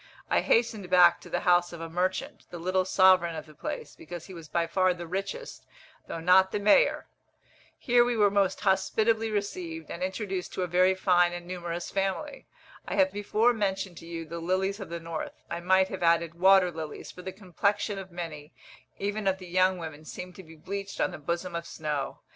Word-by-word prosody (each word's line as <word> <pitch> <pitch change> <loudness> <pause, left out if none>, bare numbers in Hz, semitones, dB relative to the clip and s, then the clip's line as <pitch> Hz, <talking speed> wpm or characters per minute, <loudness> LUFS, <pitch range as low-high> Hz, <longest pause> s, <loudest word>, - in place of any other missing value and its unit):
I - - +4
hastened 225 -5 +1
back 180 -1 +6
to - - -12
the - - -1
house 175 0 +3
of 170 - -8
a 165 - -5
merchant, 185 - -2
the 175 - -7
little 185 +2 0
sovereign 185 -3 +4
of 155 - -6
the 155 - -15
place, 150 - -6
because 175 +1 -9
he 190 - -11
was 165 -3 -10
by 170 -1 +1
far 185 +1 +2
the 175 0 -7
richest, 195 - -5 0.4
though 165 - -5
not 185 +3 +5
the - - -1
mayor. 210 - +4 0.7
Here 240 -1 +4
we 240 -1 0
were 205 -2 +4
most 195 -2 +1
hospitably 220 +3 +2
received, 180 -6 -4
and 170 - -6
introduced 190 0 -3
to 185 - -2
a - - -1
very 185 +2 +3
fine 180 -2 +3
and 175 0 -6
numerous 175 -1 -5
family. 195 +10 -3 0.4
I - - -2
have 285 -1 +3
before 215 +4 +2
mentioned 195 -4 -2
to 165 - -12
you 165 -1 -5
the 170 +2 -6
lilies 190 +4 -1
of 195 - -7
the 170 0 -4
north, 165 -1 -6
I 170 - -2
might 190 +2 +3
have 190 - -6
added, 170 -1 +2
water 185 +1 +5
lilies, 155 -2 -7
for 180 - -11
the 190 - -6
complexion 200 +2 -1
of 190 -1 -9
many, 160 -5 -7 0.4
even 205 +1 -2
of 190 0 +2
the 185 - -10
young 185 +1 +3
women, 155 -3 -8
seem 180 +3 -8
to 190 - -11
be 160 -1 -14
bleached 195 +5 -6
on - - +1
the 175 - -8
bosom 170 +4 -3
of 170 0 -4
snow. 150 -3 -4
185 Hz, 205 wpm, -28 LUFS, 170-195 Hz, 0.7 s, back